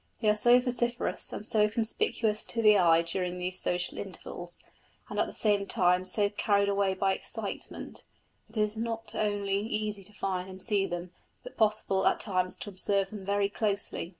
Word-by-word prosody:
They 215 - +2
are 210 - +4
so 240 +3 +6
vociferous 245 -1 -1
and 210 - -6
so 215 -2 +3
conspicuous 220 -1 0
to 230 -1 -2
the 210 -1 +7
eye 165 -2 +5
during 180 +1 -2
these 180 +1 -2
social 180 0 -1
intervals, 175 -2 -6 0.5
and - - -3
at - - +2
the - - -7
same 205 -2 +2
time 180 0 +3
so 205 +2 +3
carried 200 -1 +2
away 200 -1 +1
by 195 0 +2
excitement, - - -6 0.4
that 220 0 -11
it - - +3
is 210 +1 -2
not 225 -1 -4
only 205 -2 0
easy 210 -1 -3
to 210 - -12
find 185 -2 -3
and 190 0 -9
see 200 -1 0
them, 175 0 -5 0.3
but - - -10
possible 210 -3 +2
at - - +3
times 185 -3 -1
to - - -5
observe 195 0 0
them 210 -3 -7
very 200 +1 +1
closely. 200 -4 -1
200 Hz, 185 wpm, -29 LUFS, 185-215 Hz, 0.5 s, the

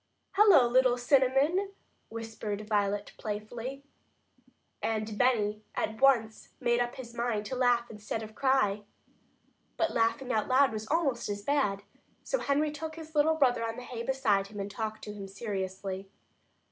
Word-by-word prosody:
"Hello, 390 - +6
little 250 0 +4
Cinnamon!" 275 +9 +2 0.4
whispered 220 -2 -5
Violet 205 -1 0
playfully. 230 +6 -5 1.0
And 215 -1 -2
Benny 215 -3 +2
at 220 +2 -2
once 235 -5 +3
made 240 0 +2
up 245 0 -1
his 240 -3 -9
mind 235 -3 -1
to 260 - -4
laugh 245 -2 +2
instead 210 0 -5
of 220 0 -9
cry. 260 -6 +2 1.0
But 330 - +1
laughing 230 +3 +1
out 215 -1 +1
loud 265 0 +4
was 215 0 -5
almost 285 -8 0
as 205 0 -4
bad, 205 -8 +1 0.4
so - - -1
Henry 295 +2 +1
took 315 +1 -6
his 320 -1 -10
little 310 +1 +3
brother 255 -6 +2
on 225 0 -2
the 250 - -8
hay 245 -1 -6
beside 230 -6 +1
him 205 0 -9
and 200 +1 -4
talked 220 +1 -4
to 210 - -6
him 200 -1 -7
seriously. 195 -1 -4
235 Hz, 155 wpm, -30 LUFS, 210-270 Hz, 1.0 s, Hello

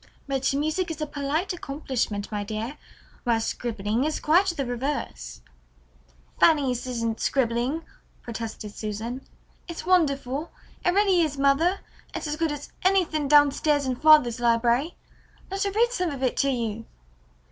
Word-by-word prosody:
"But 270 -1 0
music 310 +5 0
is 325 -1 -5
a 305 - -1
polite 300 +6 -2
accomplishment, 260 -10 -3
my 205 -1 -2
dear, 220 +7 -5 0.4
whereas 230 -2 +1
scribbling 225 0 -2
is 310 +1 -1
quite 350 +6 +4
the 325 -7 -1
reverse." 245 - -4 1.0
"Fanny's 270 -6 +3
isn't 230 -2 -2
scribbling," 255 +4 0 0.4
protested 225 -2 -6
Susan. 220 +4 -5 0.5
"It's 340 -2 -6
wonderful. 295 -5 +1 0.3
It - - +3
really 395 -3 +4
is, 300 -4 0
mother. 280 +7 +2 0.3
It's - - -4
as 300 0 -2
good 320 0 0
as 290 -1 -7
anything 355 -6 +2
down 290 0 +6
stairs 290 0 +1
in 260 -1 -1
father's 255 -5 +5
library. 240 +6 +2 0.6
Let 390 +1 -1
her 400 - 0
read 465 +4 +2
some 365 -7 -1
of 275 -3 -5
it 255 - +1
to 275 - +2
you." 230 -3 -2
275 Hz, 145 wpm, -25 LUFS, 235-315 Hz, 1.0 s, down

